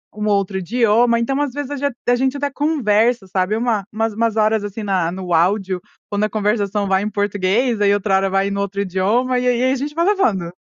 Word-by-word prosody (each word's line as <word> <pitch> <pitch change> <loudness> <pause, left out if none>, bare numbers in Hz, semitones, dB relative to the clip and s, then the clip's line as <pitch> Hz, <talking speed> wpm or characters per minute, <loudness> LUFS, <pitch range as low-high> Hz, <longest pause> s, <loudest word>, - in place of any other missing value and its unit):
um 210 0 -3
outro 200 -2 0
idioma, 235 +4 +2
então, 270 +4 -1
às 285 -4 -2
vezes 290 0 -5
a - - -2
ge 285 +1 0 0.2
a 245 - +5
gente 265 +2 0
até 285 0 -2
conversa, 245 -7 +1
sabe, 185 +2 0
uma 225 -4 -1
umas 225 0 -1
umas 225 0 0
horas, 215 -1 +2
assim, 205 +2 -6
na 185 -5 0
no 185 -1 -4
áudio, 185 +2 +1 0.3
quando 205 0 0
a - - -3
conversação 205 -1 0
vai 190 0 +2
em 210 - -2
português, 205 +3 0
aí 200 0 +4
outra 200 -1 +1
hora 195 0 0
vai 195 +1 0
no 200 - -2
outro 200 0 -3
idioma 210 +7 0
e 250 - -1
aí 245 -1 +2
e - - 0
aí, 260 - +3
a - - +1
gente 290 +3 -5
vai 335 +1 +1
levando, 220 - +1
210 Hz, 235 wpm, -19 LUFS, 195-245 Hz, 0.3 s, a